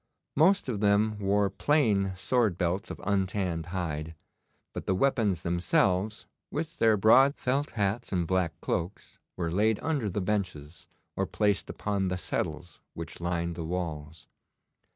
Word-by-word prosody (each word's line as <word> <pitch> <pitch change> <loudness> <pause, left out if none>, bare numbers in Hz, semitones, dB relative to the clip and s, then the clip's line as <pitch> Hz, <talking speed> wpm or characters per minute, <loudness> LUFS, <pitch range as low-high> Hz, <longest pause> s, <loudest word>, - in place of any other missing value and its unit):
Most 185 +5 +4
of 115 -6 -2
them 105 +1 +2
wore 100 0 +2
plain 105 -8 +2
sword 105 0 +1
belts 90 +2 -1
of - - -7
untanned 95 -4 -1
hide, 80 -3 -4 0.6
but - - -6
the 95 - +2
weapons 105 -7 +1
themselves, 90 +4 +1 0.2
with 165 +3 -4
their 110 -1 +4
broad 130 +8 +6
felt 135 +3 -1
hats 105 +3 -1
and 90 -2 0
black 90 -2 0
cloaks, 90 +3 -4 0.2
were 85 -2 -2
laid 105 +4 +2
under 145 -9 0
the 100 - -2
benches 90 -6 -3 0.3
or - - -1
placed 105 -2 0
upon 100 -2 -1
the 90 0 -1
settles 80 -1 -4
which 85 +1 -7
lined 85 -1 -1
the 85 - -5
walls. 80 -3 -5
95 Hz, 145 wpm, -28 LUFS, 85-110 Hz, 0.6 s, broad